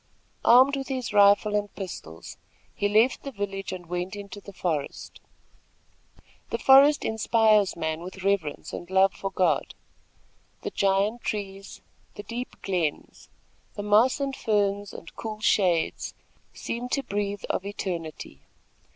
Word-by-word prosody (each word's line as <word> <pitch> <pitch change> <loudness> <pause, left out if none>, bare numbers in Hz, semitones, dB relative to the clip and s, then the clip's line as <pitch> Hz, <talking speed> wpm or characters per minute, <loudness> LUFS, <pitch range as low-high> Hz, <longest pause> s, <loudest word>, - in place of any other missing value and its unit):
Armed 260 +4 +6
with 270 -1 -4
his 255 -5 -3
rifle 205 +1 +5
and 205 0 -1
pistols, 80 - -8 0.4
he 205 - 0
left 220 +5 +3
the 275 - -6
village 200 -3 -4
and 185 -2 -7
went 180 +3 -4
into 205 0 -9
the 200 - -11
forest. 160 -6 -4 1.3
The - - -1
forest 275 +2 +6
inspires 220 -2 +3
man 160 -1 -2
with 185 +2 -9
reverence 195 -7 -1
and 175 - -7
love 190 +1 +4
for 195 - -4
God. 180 -6 0 0.9
The - - -3
giant 200 +4 +1
trees, 195 -2 -5 0.3
the 205 - -7
deep 240 +3 -6
glens, 175 -6 -3 0.5
the 205 - -4
moss 215 +7 +4
and 275 -1 -2
ferns 205 -3 0
and - - -11
cool 215 -1 -6
shades 180 -6 +1 0.4
seem 245 +2 -5
to 275 +2 0
breathe 205 -3 -3
of - - -2
eternity. 170 - -6
200 Hz, 135 wpm, -26 LUFS, 185-220 Hz, 1.3 s, Armed